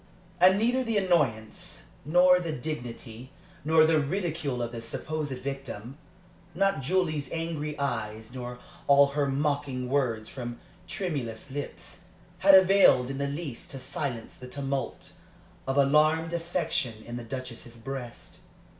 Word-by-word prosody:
And 185 +2 +7
neither 245 +4 +2
the 230 -3 0
annoyance, 145 - 0 0.2
nor 180 +3 +6
the 170 -3 -3
dignity, 125 -4 -6 0.3
nor 160 +2 +5
the 160 -1 +4
ridicule 155 -5 -2
of 115 - -4
the 115 -1 -6
supposed 150 +5 -3
victim 135 -1 -6 0.6
not 195 -4 +2
Julie's 155 -2 0
angry 160 -2 -3
eyes, 110 -4 -3
nor 125 -1 -6 0.3
all 140 0 +7
her 140 0 0
mocking 140 -2 -1
words 120 -6 0
from 120 -2 -6 0.3
tremulous 140 - -4
lips 145 +1 -7 0.3
had 195 0 +8
availed 190 -9 +6
in 135 - -5
the 140 - 0
least 140 -3 -5
to 135 - -6
silence 130 -3 -4
the 125 - -10
tumult 135 -1 -4 0.5
of 135 +1 0
alarmed 155 +4 +4
affection 165 -10 -2
in 120 - -6
the 120 - -6
Duchess's 120 -1 -7
breast. 125 0 -7
140 Hz, 135 wpm, -28 LUFS, 125-165 Hz, 0.6 s, had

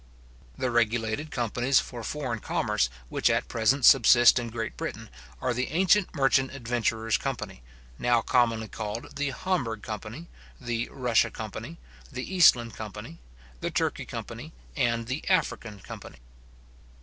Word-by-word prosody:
The 130 - -1
regulated 115 +4 0
companies 120 +2 +1
for 120 -2 -6
foreign 130 -4 -3
commerce 130 - 0 0.2
which - - +2
at - - +1
present 115 +4 +2
subsist 120 -1 +7
in 120 -1 -4
Great 115 0 -4
Britain, - - -6 0.3
are 125 - 0
the 125 +2 -1
ancient 185 +4 +2
merchant 135 -1 +2
adventurers 115 -3 0
company, 110 - -5 0.4
now 120 -2 +2
commonly 115 -3 +2
called 110 +2 -6
the 145 0 -1
Hamburgh 130 - -2
company, 110 - -7 0.3
the 120 -2 -3
Russia 125 -4 +2
company, - - -7 0.3
the 130 +9 -6
Eastland 120 - +5
company, 110 - -8 0.4
the - - -2
Turkey - - -1
company, - - -7 0.2
and 115 -1 +1
the 130 +6 -4
African 115 - 0
company. - - -10
120 Hz, 135 wpm, -27 LUFS, 115-135 Hz, 0.4 s, subsist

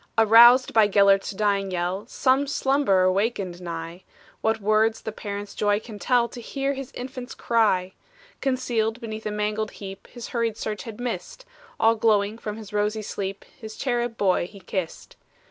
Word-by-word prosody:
Aroused 235 +3 +7
by 220 -2 +5
Gelert's 200 -1 +4
dying 200 -1 0
yell, 185 +4 -2
Some 265 +2 +1
slumberer 265 -10 +2
wakened 195 -3 -2
nigh; 170 0 -6 0.4
What 220 0 +1
words 215 +2 +2
the 220 - -4
parent's 205 -1 -6
joy 205 0 +1
can 220 -2 -10
tell, 245 0 +2
To 240 - -9
hear 275 +4 -2
his 270 -2 -7
infant 255 0 -7
cry! 200 -6 +1 0.5
Concealed 245 -4 0
beneath 220 -2 -6
a - - -2
mangled 210 +1 -2
heap, 195 -1 -9
His 240 -2 -9
hurried 230 -3 -1
search 210 -1 -4
had 225 -2 -8
missed, 250 - -5 0.3
All 225 +1 +5
glowing 215 -1 +1
from 210 -1 -5
his 210 -2 -10
rosy 210 +1 0
sleep, 195 -1 -5 0.2
His 220 -1 -8
cherub 240 -3 -2
boy 185 -3 +2
he 200 +1 -14
kissed! 185 -2 -5
215 Hz, 165 wpm, -24 LUFS, 200-235 Hz, 0.5 s, Aroused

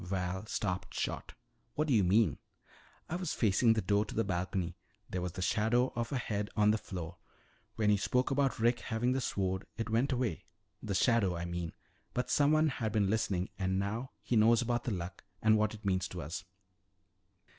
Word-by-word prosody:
Val 95 +2 -3
stopped 90 -5 -3
short. - - -3 0.4
"What 155 +1 +1
do 140 - +2
you 105 -4 +5
mean?" 100 +4 +3 0.7
"I 175 - -2
was 180 -3 -3
facing 110 +1 +4
the 110 - -1
door 100 +2 +3
to - - -8
the 115 - +2
balcony. 90 -2 -2 0.3
There 90 - -3
was 90 -1 -3
the 95 - -3
shadow 115 +7 +2
of 120 -1 -2
a 140 - 0
head 105 -4 -2
on 105 0 +5
the 110 - +1
floor. 90 -3 -6 0.6
When 105 -1 +3
you 100 - +3
spoke 125 +7 +1
about 135 -1 +2
Rick 120 +2 +2
having 120 +2 0
the 130 +1 0
sword, 95 -4 -1
it 115 0 -3
went 120 +5 +2
away 120 -9 -1 0.4
the 100 -2 -3
shadow, 110 -5 +3
I 85 0 -3
mean. 85 -1 -4 0.4
But 125 - -1
someone 155 +2 +4
had 115 -5 -2
been 100 -2 +2
listening 100 -4 0
and 95 0 0
now 110 +6 -2
he 125 - 0
knows 115 +1 +6
about 120 0 0
the 120 - -1
Luck 90 -2 -5 0.2
and 110 0 +5
what 110 0 +1
it 105 - -14
means 95 -1 +1
to 90 -5 -6
us." 85 +5 -5
105 Hz, 200 wpm, -32 LUFS, 95-120 Hz, 0.7 s, knows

